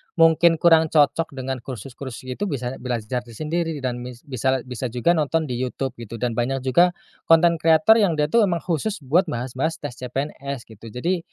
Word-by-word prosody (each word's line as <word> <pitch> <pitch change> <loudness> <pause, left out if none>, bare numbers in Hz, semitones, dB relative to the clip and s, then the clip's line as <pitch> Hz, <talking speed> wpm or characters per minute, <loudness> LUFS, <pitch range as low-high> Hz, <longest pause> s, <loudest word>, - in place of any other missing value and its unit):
mungkin 165 0 +5
kurang 160 0 +5
cocok 150 0 +2
dengan 130 0 -4
kursus-kursus 130 +1 -8
itu 130 +11 -4
bisa 130 -4 -4
belajar 125 -1 -3
itu 120 -2 -13
sendiri, 160 -1 -2
dan 125 -1 -2
mis 125 -1 -9
bisa 130 -1 -1
bisa 125 0 -4
juga 125 +8 +1
nonton 160 -1 +1
di 125 -4 -4
YouTube, 130 0 -3
gitu. 115 0 -8
Dan 120 +1 -1
banyak 130 +2 -1
juga, 175 +7 +3 0.3
content 165 0 +5
creator 165 +8 +5
yang 190 -6 +2
dia 150 0 0
tuh 225 -4 +4
emang 170 -2 -2
khusus 180 +1 -2
buat 170 +8 +2
bahas-bahas 130 +4 -2
tes 145 -4 -6
CPNS, 135 0 -4
gitu. 110 +2 -12
Jadi, 170 - -1
140 Hz, 185 wpm, -23 LUFS, 125-165 Hz, 0.3 s, mungkin